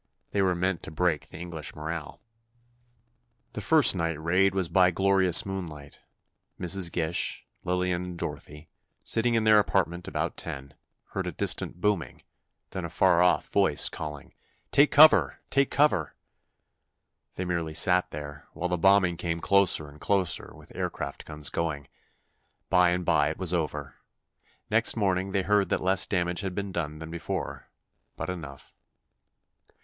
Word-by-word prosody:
They 100 - 0
were 95 -2 +2
meant 90 0 -1
to - - -7
break 80 -1 -1
the - - -11
English 85 -2 -7
morale. 80 0 -6 1.3
The - - -5
first - - +6
night 85 -2 -2
raid 90 +4 +2
was 95 -3 0
by 90 +2 +4
glorious 95 +2 +3
moonlight. 85 -7 -7 0.6
Mrs. 90 -1 -1
Gish, 85 0 -1 0.2
Lillian 90 0 -1
and 90 -1 -7
Dorothy, 75 -2 -8 0.3
sitting 115 +1 +1
in 115 - +2
their 110 -1 +6
apartment 90 -4 -1
about - - -3
ten, 70 0 -7 0.4
heard - - -4
a - - -2
distant - - -2
booming, 105 -4 -1 0.5
then - - -5
a - - -5
far 90 -2 +3
off 90 -4 +2
voice - - +2
calling: 75 -3 -8 0.4
"Take 145 +2 +5
cover—take 145 -2 +4
cover!" 135 - +1 1.2
They 90 - -4
merely 85 -3 -3
sat 90 +2 +3
there, 75 0 -9
while 90 +2 -3
the 90 -1 -1
bombing 95 -1 +4
came 85 -1 -3
closer 100 -5 +3
and 75 +1 -15
closer, 95 -3 0
with - - -16
aircraft - - -5
guns 75 -1 -2
going. 75 -4 -3 0.8
By 90 -1 +5
and 90 0 -1
by 75 -3 +2
it 80 - -5
was 90 -2 0
over. 75 -5 -3 0.7
Next 115 +2 +3
morning, 95 -2 0
they 95 -1 0
heard 100 0 +2
that - - 0
less 95 0 +2
damage 90 -2 -1
had 95 -2 -5
been 100 -1 -4
done 75 -4 -4
than 80 +1 -9
before, 85 -1 -5 0.5
but - - -4
enough. 75 -6 -10
90 Hz, 150 wpm, -27 LUFS, 80-95 Hz, 1.3 s, first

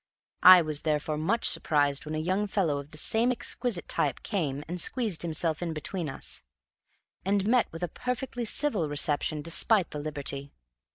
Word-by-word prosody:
I 180 -1 +9
was 155 -2 -2
therefore 150 0 -1
much 200 +9 0
surprised 145 -1 +3
when 155 - -4
a - - -2
young 185 +6 -1
fellow 170 -8 0
of 140 +1 -10
the 220 +10 +1
exquisite 240 -5 -2
type 140 -4 -1
came 150 -9 -2
and 175 +1 -4
squeezed 220 -7 0
himself 160 -1 0
in 170 -2 -3
between 160 +1 -3
us, 135 - -4 0.8
and 195 0 0
met 240 +2 +2
with 165 +2 -7
a - - 0
perfectly 250 +4 -4
civil 215 - 0
reception 145 +1 0
despite 180 +3 +2
the 150 - -5
liberty. 140 -2 -4
165 Hz, 165 wpm, -28 LUFS, 150-205 Hz, 0.8 s, I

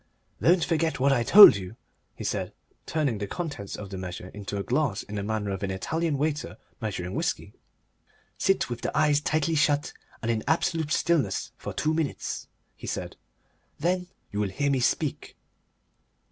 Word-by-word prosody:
"Don't 175 +1 +4
forget 160 -4 0
what 140 +1 +4
I 120 - +2
told 195 - +10
you," 95 +2 -8 0.4
he - - -7
said, - - -2 0.3
turning 140 -9 0
the 100 - -3
contents 145 - -5
of 100 -1 -8
the 95 - -5
measure 90 0 -6
into 100 0 -6
a 100 - -2
glass 125 -5 0
in 105 - -11
the 105 - -2
manner 105 -1 -2
of 95 - -4
an 100 - -2
Italian 155 - -1
waiter 150 +1 -2 0.2
measuring 95 -4 -3
whisky. - - -2 0.9
"Sit 195 - +2
with 120 -1 -5
the - - -2
eyes 150 -1 +3
tightly 155 +1 0
shut 150 -1 +2 0.3
and 115 - +1
in 110 -1 -1
absolute 160 -1 +1
stillness 170 -5 +1
for - - -6
two 155 +1 0
minutes," 155 -3 -3 0.3
he - - -10
said. - - -4 0.6
"Then 180 +3 0 0.2
you 100 - -3
will 105 -2 0
hear 140 +8 0
me 135 - +2
speak." 120 - -1
140 Hz, 175 wpm, -27 LUFS, 100-155 Hz, 0.9 s, told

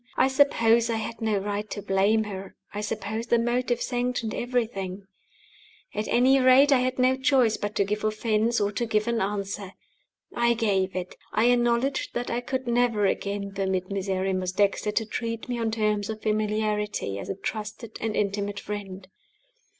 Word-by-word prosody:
I 265 - +4
suppose 235 -4 +4
I 230 - +1
had 225 +1 -5
no 220 -2 +1
right 205 +1 -3
to - - -4
blame 200 +2 +2
her; 195 -2 -7 0.2
I 205 - -3
suppose 215 +2 -3
the 235 - +4
motive 240 +1 0
sanctioned 245 -2 -1
everything. 205 -6 -2 0.9
At 210 +1 -2
any 260 +3 +4
rate, 260 +3 +6
I 270 - +6
had 255 0 -1
no 255 0 +4
choice 260 -4 +3
but 205 0 -4
to - - +3
give 210 +2 -3
offense 215 +2 +1
or 205 0 +1
to 235 +3 -2
give 215 0 +1
an 235 -1 +1
answer. 200 -1 -3 0.6
I 235 0 +3
gave 195 -5 0
it. 185 -1 -4 0.2
I 235 +3 +4
acknowledged 240 +2 +1
that 240 0 -2
I 240 - -1
could 260 +1 -3
never 235 -3 +2
again 200 0 -1
permit 190 -1 -1
Miserrimus 190 -1 -1
Dexter 205 +2 +1
to 225 +1 0
treat 230 +1 -4
me 245 -1 -2
on 225 -1 0
terms 215 -2 0
of 215 -1 -5
familiarity 210 - -1
as - - -7
a - - -2
trusted 215 +3 -6
and 220 -1 -1
intimate 205 0 -1
friend. 195 -2 -6
215 Hz, 175 wpm, -26 LUFS, 200-240 Hz, 0.9 s, rate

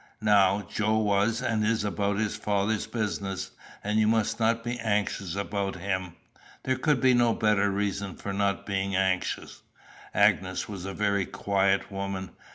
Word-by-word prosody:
Now, 100 -1 +4
Joe 110 +3 0
was 110 +3 +1
and 110 -4 0
is 110 0 +1
about 100 0 -1
his 110 -1 -1
Father's 105 +1 0
business, 100 -4 -3 0.3
and 105 +1 +1
you 110 - +3
must 110 0 +1
not 115 0 +2
be 120 +1 -3
anxious 100 -4 -1
about 100 0 -2
him. 95 -1 -3 0.5
There 130 - +1
could 145 0 +2
be 130 +1 +4
no 120 -2 +3
better 105 -2 +2
reason 100 -1 -2
for 100 - -5
not 100 0 0
being 95 -1 -1
anxious." 95 -1 -1 0.5
Agnes - - +2
was 95 -3 -7
a 95 - -4
very 100 -2 +1
quiet 100 0 +1
woman. 95 -1 -4
100 Hz, 160 wpm, -27 LUFS, 100-110 Hz, 0.5 s, Now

